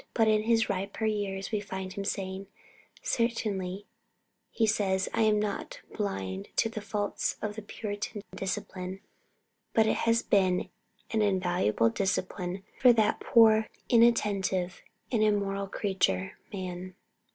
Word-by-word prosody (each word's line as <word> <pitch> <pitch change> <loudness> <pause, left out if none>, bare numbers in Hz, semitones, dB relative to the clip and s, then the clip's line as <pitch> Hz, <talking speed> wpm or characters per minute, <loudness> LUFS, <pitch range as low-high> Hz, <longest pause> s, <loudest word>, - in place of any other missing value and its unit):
But 225 -2 +4
in 215 -1 +4
his 225 -1 +3
riper 200 +2 -2
years 200 -2 -2
we 215 - +1
find 190 -2 -5
him 200 - -4
saying: 195 -1 -3 0.6
"Certainly," 205 -5 -1 0.6
he 225 - +1
says, 195 -3 +1
"I - - +1
am 215 -1 +4
not 210 -1 -3
blind 95 - -3
to 225 - +2
the 220 -1 -5
faults 205 -1 -2
of 210 -1 -3
the 220 - -5
Puritan 205 0 -5
discipline, 185 0 -4 0.7
but 220 - +5
it 220 - +2
has 230 0 +2
been 185 -2 +2 0.4
an 220 - +2
invaluable 180 - +2
discipline 185 +3 -2 0.2
for 250 - +8
that 220 -2 +2
poor, 220 -2 +5 0.2
inattentive, 200 -6 +3 0.3
and 230 -4 +2
immoral 200 -2 +1
creature, 190 -1 -1
man. 185 -2 -6
200 Hz, 130 wpm, -29 LUFS, 190-215 Hz, 0.7 s, for